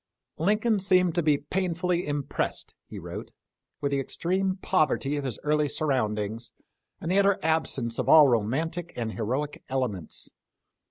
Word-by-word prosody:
" - - -61
Lincoln 210 +5 +2
seemed 185 -2 +3
to 175 - +1
be 150 -3 +3
painfully 180 +2 -1
impressed," 145 -2 -2
he - - -9
wrote, - - -7 0.3
" - - -57
with 140 - 0
the 140 - +1
extreme 185 +7 -1
poverty 155 -6 +1
of 145 - -2
his 130 -5 -3
early 150 0 +2
sur 155 - -1
roundings, 110 -4 -1 0.5
and 165 - -3
the 195 - +4
utter 200 0 +4
absence 140 -7 0
of - - -1
all 155 -2 +9
romantic 150 +9 -1
and 115 -2 -3
heroic 130 +7 -3
elements. 125 - -3
150 Hz, 160 wpm, -27 LUFS, 130-180 Hz, 0.5 s, all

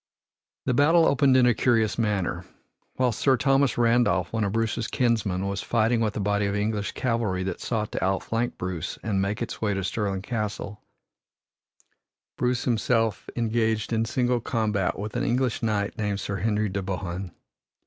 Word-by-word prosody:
The 125 - +1
battle 160 +6 +5
opened 135 -2 +4
in 125 - +5
a 120 - +5
curious 115 -2 +1
manner. 105 -5 0 0.5
While 125 -1 +2
Sir 130 +4 +2
Thomas 135 0 +2
Randolph, 115 -7 +2
one 110 -1 0
of 100 - 0
Bruce's 115 +1 -1
kinsmen, 105 -7 0
was 100 0 -2
fighting 115 0 +1
with 110 -1 -1
a - - -1
body 100 0 +1
of 100 - -1
English 105 0 -1
cavalry 115 -7 -1
that 95 -2 -4
sought 110 -3 -2
to - - -3
outflank 115 +5 -1
Bruce 90 -3 -4
and 100 -3 0
make 100 +4 -1
its 115 - -7
way 105 -2 +1
to 95 - -2
Stirling 95 +1 -2
Castle, 105 -2 -4 1.5
Bruce 125 0 0
himself 115 -2 0
engaged 110 -1 0
in 115 0 +1
single 125 +1 +1
combat 105 -5 0
with 105 +3 -5
an 120 - 0
English 125 -2 0
knight 105 -2 -1
named 105 -2 -1
Sir 100 0 -3
Henry 105 +2 0
de 100 +1 -2
Bohun. 95 -1 -4
110 Hz, 170 wpm, -26 LUFS, 100-120 Hz, 1.5 s, battle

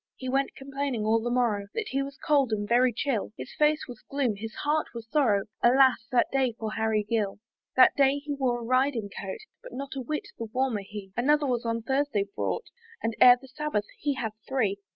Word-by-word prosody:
He 260 - -7
went 270 +1 0
complaining 270 -4 -3
all 225 +1 +3
the 240 - -2
morrow 235 -5 +1
That 440 - -2
he 275 - 0
was 275 0 -6
cold 280 -5 +2
and 205 -1 -1
very 245 +2 +4
chill: 230 -3 -2
His - - -8
face 300 0 +2
was 245 -4 -10
gloom, 270 -6 0
his 220 +2 -7
heart 300 +1 0
was 230 -1 -7
sorrow, 225 -8 +2 0.2
Alas! 255 -2 +4
that 245 - +4
day 265 -3 +1
for 220 -1 -4
Harry 220 -1 +1
Gill! 210 -3 0 0.4
That 260 - +7
day 275 0 +4
he 290 0 -4
wore 255 -4 0
a - - -6
riding 255 -4 +1
coat, 460 - -6 0.2
But - - -11
not 275 +1 -6
a 270 - -3
whit 300 +5 -4
the 230 - -3
warmer 250 -4 0
he: 195 -1 -9
Another 295 +5 +3
was 245 -3 -1
on 230 0 -1
Thursday 265 -4 0
brought, 470 - -2 0.4
And 225 -1 -1
ere 250 0 +9
the 265 - -14
Sabbath 270 -6 -2
he 285 -1 0
had 235 -4 -3 0.2
three. 215 -7 0
250 Hz, 215 wpm, -27 LUFS, 225-275 Hz, 0.4 s, ere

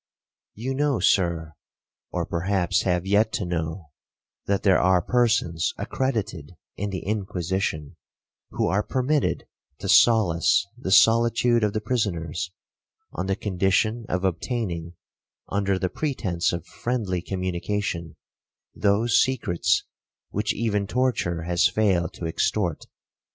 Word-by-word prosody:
'You 125 +5 -3
know, 140 -3 +1
Sir, 85 -4 +1 0.6
or 85 -1 -2
perhaps 90 +2 0
have 90 -1 0
yet 105 +3 +3
to 100 - -1
know, 80 -1 -4 0.6
that 100 -1 0
there 95 -3 +5
are 90 0 +4
persons 110 -6 +1
accredited 105 - -3 0.2
in 100 +1 -3
the 95 -2 -5
Inquisition, 95 -6 -2 0.5
who - - -1
are 100 +2 +2
permitted 130 +6 0 0.3
to 100 - -6
solace 100 0 +4
the 125 -6 -6
solitude 115 +2 +4
of 105 -1 +1
the 110 - -1
prisoners, 90 -7 -2 0.6
on 90 +3 -4
the 95 - +1
condition 105 +4 0
of 90 +1 -1
obtaining, 85 -3 -2 0.6
under 100 -1 0
the 95 - -1
pretence 95 - -1
of 85 -2 -4
friendly 110 -8 -2
communication, 90 -2 -3 0.6
those 105 +3 +3
secrets 115 -10 +1 0.5
which 105 +1 0
even 105 -3 -1
torture 110 -9 0
has 85 0 +3
failed 95 -6 +1
to 85 - -7
extort. 85 +1 -1
100 Hz, 120 wpm, -25 LUFS, 85-110 Hz, 0.6 s, there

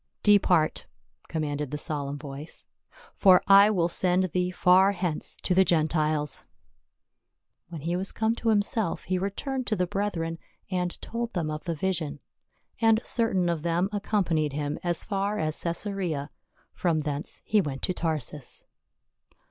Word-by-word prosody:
"Depart!" 185 -6 +3 0.4
commanded 150 -3 -3
the 150 - -3
solemn 145 -1 -3
voice, 145 +1 -8 0.5
"for 185 -2 +5
I 200 +1 +8
will 180 -6 +2
send 180 +1 +1
thee 180 +1 0
far 185 +2 +4
hence 175 -5 -1
to 185 - +1
the 190 +1 +6
Gentiles." 155 -3 +1 1.3
When 165 -4 -7
he 170 +4 -1
was 190 +2 -1
come 220 0 0
to 230 - 0
himself 210 -2 +1
he 185 0 -1
returned 250 +7 -3
to 215 - +1
the 180 -2 +1
brethren 175 -4 -2 0.3
and 180 -1 -2
told 235 0 -4
them 160 -4 -1
of 155 +3 -6
the 170 -2 -2
vision. 160 -3 -2 0.6
And 225 -1 +4
certain 195 -7 +1
of 170 -3 -1
them 170 +3 0
accompanied 185 -8 0
him 145 0 -3
as 175 -1 -1
far 200 0 -1
as 155 -3 +1
Caesarea; 170 -4 -2 0.4
from 165 -3 0
thence 150 +1 -4
he 215 -1 +3
went 140 -6 -5
to 185 - +1
Tarsus. 150 -5 -3
175 Hz, 150 wpm, -27 LUFS, 155-195 Hz, 1.3 s, I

